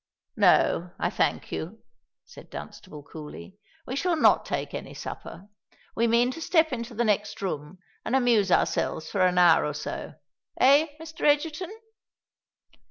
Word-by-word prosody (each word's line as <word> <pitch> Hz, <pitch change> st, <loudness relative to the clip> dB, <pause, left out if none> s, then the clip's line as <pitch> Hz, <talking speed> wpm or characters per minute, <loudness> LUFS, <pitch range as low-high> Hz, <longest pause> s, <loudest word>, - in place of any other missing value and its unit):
"No, 175 Hz, +1 st, +3 dB
I -, -, -1 dB
thank -, -, -1 dB
you," 195 Hz, +8 st, -6 dB, 0.4 s
said -, -, -14 dB
Dunstable, 150 Hz, -1 st, -10 dB
coolly: 155 Hz, +6 st, -10 dB, 0.3 s
"we 260 Hz, -, -4 dB
shall 340 Hz, +5 st, +1 dB
not 310 Hz, -, +4 dB
take -, -, -3 dB
any -, -, -7 dB
supper. 195 Hz, -, -8 dB, 0.5 s
We 230 Hz, +1 st, +2 dB
mean 235 Hz, +2 st, +3 dB
to 330 Hz, -, -8 dB
step 320 Hz, -3 st, +2 dB
into 235 Hz, -1 st, -5 dB
the 240 Hz, +2 st, 0 dB
next 210 Hz, -1 st, 0 dB
room 160 Hz, -2 st, -5 dB, 0.3 s
and 240 Hz, -, -1 dB
amuse 235 Hz, -7 st, +3 dB
ourselves 160 Hz, -2 st, 0 dB
for 195 Hz, -, 0 dB
an 180 Hz, -1 st, +3 dB
hour 175 Hz, -2 st, +6 dB
or 150 Hz, -1 st, -3 dB
so—eh, 280 Hz, -, 0 dB
Mr. 320 Hz, 0 st, -11 dB
Egerton?" 310 Hz, +4 st, +1 dB
230 Hz, 145 wpm, -26 LUFS, 180-285 Hz, 0.5 s, hour